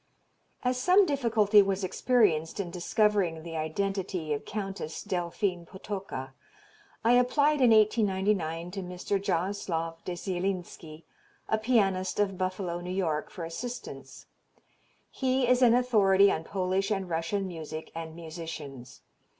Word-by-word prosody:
As 250 0 0
some 370 +6 +5
difficulty 225 - +4
was 195 0 -1
experienced 185 -6 +1
in 180 -3 -3
discovering 180 -2 +1
the 165 -1 -7
identity 180 0 -2
of 145 - -4
Countess 195 -6 -5
Delphine 180 -1 -2
Potocka, 190 -7 -6 0.7
I 230 - +5
applied 285 +4 +3
in 250 - +6
1899 195 -6 +2
to 195 +1 -5
Mr. 180 +2 -3
Jaraslow 170 -3 -1
de 180 - -4
Zielinski, 175 -3 -4 0.4
a 220 - +1
pianist 195 -6 +1
of 200 -2 +1
Buffalo, 185 -1 -3
New 175 - -6
York, 165 -5 -1
for 170 - -6
assistance; 240 +9 -7 0.9
he 260 -1 +1
is 250 +1 +3
an 240 -2 +6
authority 200 -6 +4
on 160 - -2
Polish 190 0 -1
and 195 -3 -1
Russian 170 +4 -1
music 160 -2 -7
and 165 -1 -6
musicians. 160 -6 -8
190 Hz, 125 wpm, -29 LUFS, 165-210 Hz, 0.9 s, in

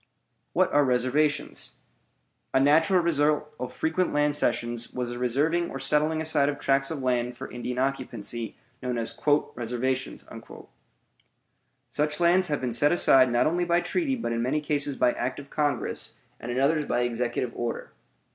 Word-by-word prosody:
WHAT - - +2
ARE 145 - +5
RESERVATIONS? 130 +4 0 0.8
A - - +6
natural 160 +6 +4
result 150 -2 +1
of 125 - -4
frequent 165 +3 0
land 150 0 +2
cessions 120 -3 -1
was 125 -1 -3
the 120 0 -6
reserving 150 +8 +1
or - - -5
setting 150 +4 +1
aside 155 -3 +2
of 145 - -3
tracts 135 0 +1
of 145 -5 -4
land 125 -1 0
for - - -8
Indian 125 0 -5
occupancy, 120 -4 -3 0.3
known 125 -2 -2
as 115 -1 -3 0.4
"reservations." 125 +2 -3 1.6
Such 150 +1 -1
lands 175 +2 +4
have 145 - -2
been 125 -2 -2
set 145 +6 +4
aside 130 -7 +5
not 120 - +3
only 175 +3 +1
by 170 0 +2
treaty 285 - -1
but 230 - -3
in 115 - -1
many 130 +6 0
cases 145 -1 -1
by 125 - +3
act 130 +3 -3
of 140 - -12
Congress, 145 -5 -1 0.2
and 120 - -5
in 125 - -1
others 150 +2 +2
by 125 - 0
executive 120 0 -1
order. 120 -1 -4
135 Hz, 165 wpm, -26 LUFS, 125-150 Hz, 1.6 s, A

